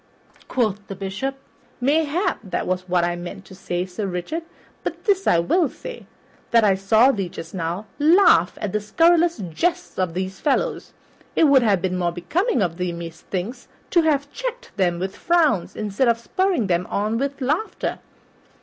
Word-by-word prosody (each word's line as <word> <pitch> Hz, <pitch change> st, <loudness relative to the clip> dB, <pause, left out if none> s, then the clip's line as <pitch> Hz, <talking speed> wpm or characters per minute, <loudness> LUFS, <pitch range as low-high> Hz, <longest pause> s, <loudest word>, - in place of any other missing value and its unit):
Quoth 210 Hz, -5 st, -1 dB
the 195 Hz, -, -6 dB
Bishop, 195 Hz, +8 st, -3 dB, 0.4 s
"Mayhap 315 Hz, +7 st, +1 dB
that 190 Hz, -4 st, -3 dB
was 185 Hz, 0 st, -2 dB
what 175 Hz, -1 st, +2 dB
I 175 Hz, 0 st, 0 dB
meant 175 Hz, +2 st, -8 dB
to -, -, -13 dB
say, 180 Hz, -1 st, -3 dB
Sir 190 Hz, +2 st, -4 dB
Richard; 180 Hz, -, -3 dB, 0.4 s
but -, -, -4 dB
this 390 Hz, -3 st, +1 dB
I -, -, +5 dB
will 280 Hz, -, +2 dB
say, -, -, -9 dB, 0.4 s
that 230 Hz, -1 st, +5 dB
I 205 Hz, -2 st, +5 dB
saw 215 Hz, +7 st, +4 dB
thee 195 Hz, -7 st, -3 dB
just 165 Hz, -1 st, -9 dB
now 175 Hz, +3 st, -3 dB
laugh 315 Hz, -, +5 dB
at 210 Hz, -, -3 dB
the 210 Hz, -, -1 dB
scurrilous 335 Hz, +10 st, +3 dB, 0.2 s
jests 350 Hz, -, -1 dB
of 180 Hz, -3 st, -1 dB
these 190 Hz, +1 st, -3 dB
fellows. 290 Hz, -3 st, -1 dB, 0.4 s
It -, -, +4 dB
would 280 Hz, -4 st, +6 dB
have 200 Hz, -6 st, +2 dB
been 185 Hz, -1 st, 0 dB
more 175 Hz, -1 st, +1 dB
becoming 275 Hz, -, 0 dB
of 170 Hz, -2 st, -2 dB
thee, 180 Hz, -1 st, -1 dB
methinks, 170 Hz, +6 st, -6 dB, 0.2 s
to 345 Hz, -, +5 dB
have 285 Hz, -3 st, 0 dB
checked -, -, -5 dB
them 175 Hz, -3 st, +1 dB
with 190 Hz, +2 st, -4 dB
frowns 320 Hz, -, +2 dB
instead 215 Hz, +4 st, 0 dB
of 235 Hz, -1 st, +3 dB
spurring 360 Hz, -, 0 dB
them 180 Hz, -1 st, 0 dB
on 215 Hz, +3 st, 0 dB
by 280 Hz, +1 st, +1 dB
laughter." 300 Hz, +11 st, -1 dB
210 Hz, 175 wpm, -22 LUFS, -, 0.4 s, would